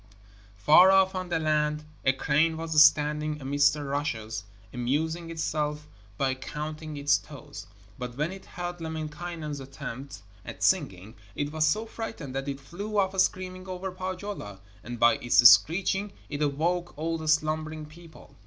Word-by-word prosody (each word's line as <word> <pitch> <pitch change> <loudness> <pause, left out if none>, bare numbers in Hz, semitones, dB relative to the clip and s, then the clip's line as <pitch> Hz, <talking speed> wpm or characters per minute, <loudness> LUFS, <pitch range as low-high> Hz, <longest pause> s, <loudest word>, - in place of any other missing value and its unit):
Far 155 - +7
off 190 0 +5
on 185 -1 -4
the 170 - +1
land 150 -1 0 0.2
a 130 - +4
crane 155 +4 +1
was 160 -2 +5
standing 150 0 +2
amidst 145 +1 +3
the 150 -1 -5
rushes, 120 -7 -3 0.3
amusing 160 +7 -1
itself 150 -2 -2 0.3
by 135 -1 +1
counting 150 +3 -6
its 145 0 +3
toes. 145 -5 -11 0.3
But 125 0 -6
when 155 +4 -1
it 190 0 -10
heard 175 -1 -6
Lemminkainen's 160 -1 -5
attempts 135 -3 -8 0.2
at - - -7
singing, 95 +4 +1 0.2
it 145 0 -2
was 155 0 +2
so 215 +9 +1
frightened 220 - -7
that 135 +1 -3
it 140 0 -4
flew 200 +9 -6
off 190 -1 +1
screaming 185 0 0
over 185 +1 -4
Pohjola, 185 - -6 0.2
and 120 +1 -7
by 115 0 +5
its 120 0 +7
screeching 195 +8 +4 0.2
it 145 +1 -4
awoke 170 +5 -1
all 165 +1 -2
the 160 - -6
slumbering 155 0 0
people. 165 +1 -15
155 Hz, 155 wpm, -27 LUFS, 140-175 Hz, 0.3 s, Far